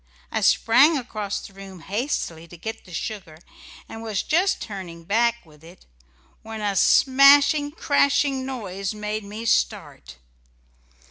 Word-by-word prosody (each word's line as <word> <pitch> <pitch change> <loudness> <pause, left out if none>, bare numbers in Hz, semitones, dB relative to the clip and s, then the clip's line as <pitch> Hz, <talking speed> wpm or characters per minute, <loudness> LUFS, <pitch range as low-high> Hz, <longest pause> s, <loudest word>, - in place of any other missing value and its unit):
I - - -1
sprang 280 +8 +4
across 215 -5 -4
the 195 - -13
room 190 -2 -12
hastily 190 - -4
to 175 - -13
get 220 +7 -7
the 180 - -15
sugar, 170 -2 -6 0.5
and 225 - -9
was 220 -3 -3
just 365 +5 +1
turning 180 -5 -8
back 235 +4 0
with 150 -1 -20
it, 170 +2 -16 0.6
when 220 0 -8
a 205 -2 -2
smashing, 280 +5 +5
crashing 280 -3 +1
noise 200 -6 -5
made 210 0 -4
me 210 +3 -8
start. - - -1
215 Hz, 135 wpm, -23 LUFS, 190-265 Hz, 0.6 s, smashing